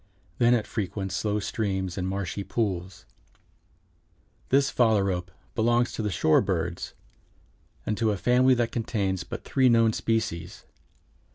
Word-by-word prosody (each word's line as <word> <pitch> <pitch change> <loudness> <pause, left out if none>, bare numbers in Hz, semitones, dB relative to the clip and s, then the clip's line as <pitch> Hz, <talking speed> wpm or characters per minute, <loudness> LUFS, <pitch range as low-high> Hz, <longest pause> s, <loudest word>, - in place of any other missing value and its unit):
Then 120 0 +5
it 110 -3 -1
"frequents 95 -2 -4
slow 105 +1 0
streams 95 -3 -2
or 95 - -3
marshy 95 +1 -3
pools." 95 - -3 1.4
This 140 +1 +3
Phalarope 100 -7 +2 0.2
belongs 120 +2 +2
to - - -4
the 105 - -1
shore 80 -3 +3
birds - - -3 0.9
and 105 - 0
to 115 - +2
a 105 - 0
family 125 +6 +4
that 120 -1 0
contains 100 -6 -1
but - - -7
three 130 -2 +3
known 115 -1 +4
species. 105 -8 -2
105 Hz, 130 wpm, -26 LUFS, 95-115 Hz, 1.4 s, Then